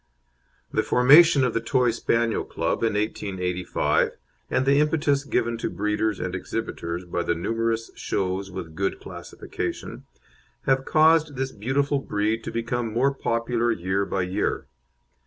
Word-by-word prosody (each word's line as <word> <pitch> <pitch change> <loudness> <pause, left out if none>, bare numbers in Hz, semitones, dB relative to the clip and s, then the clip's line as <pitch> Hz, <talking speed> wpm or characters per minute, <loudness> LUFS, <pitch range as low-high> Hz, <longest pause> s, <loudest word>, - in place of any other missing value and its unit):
The - - +3
formation 140 +3 +6
of 125 -3 +1
the 115 - 0
Toy 125 -2 +2
Spaniel 115 0 0
Club - - -2
in 115 -2 +1
1885, 95 -4 -1 0.3
and 130 - +1
the 140 +1 +4
impetus 150 -2 +2
given 120 -4 -1
to - - -2
breeders 105 0 -1
and 95 - -3
exhibitors 90 -3 -4
by 85 0 -2
the 85 0 0
numerous 115 +5 -1
shows 95 +1 -2
with 90 -4 -7
good 95 +4 -2
classification, - - -6 0.6
have 135 0 +1
caused 155 -1 +4
this 135 +1 -2
beautiful 140 +6 0
breed 110 -2 -1
to - - -4
become 115 0 -2
more 130 +5 +2
popular 120 -2 0
year 95 -1 -1
by 95 -1 -1
year. 95 +3 -1
115 Hz, 140 wpm, -25 LUFS, 100-135 Hz, 0.6 s, formation